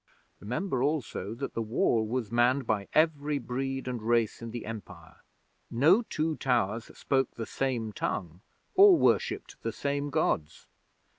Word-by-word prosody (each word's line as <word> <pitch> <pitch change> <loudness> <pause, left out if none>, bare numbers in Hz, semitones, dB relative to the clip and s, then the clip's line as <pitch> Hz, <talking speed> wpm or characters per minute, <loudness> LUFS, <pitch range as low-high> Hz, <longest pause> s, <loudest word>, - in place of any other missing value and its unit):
Remember, 125 - -2
also, 130 -7 -2
that 135 +3 -5
the 115 - -2
Wall 110 0 +1
was 115 -2 -2
manned 125 +3 +3
by 105 -3 -1
every 150 -2 +2
breed 135 +1 -3
and 125 -3 -3
race 115 0 +1
in 115 - -6
the 120 +1 -6
Empire. 100 -7 -9 0.5
No 155 - +5
two 160 -8 -2
towers 115 -3 0
spoke 135 -2 0
the 115 - -4
same 120 -5 -2
tongue, 90 -3 -3 0.3
or 390 -2 +8
worshipped - - 0
the - - -2
same 140 0 -2
Gods. 135 - -1
125 Hz, 145 wpm, -29 LUFS, 110-140 Hz, 0.5 s, or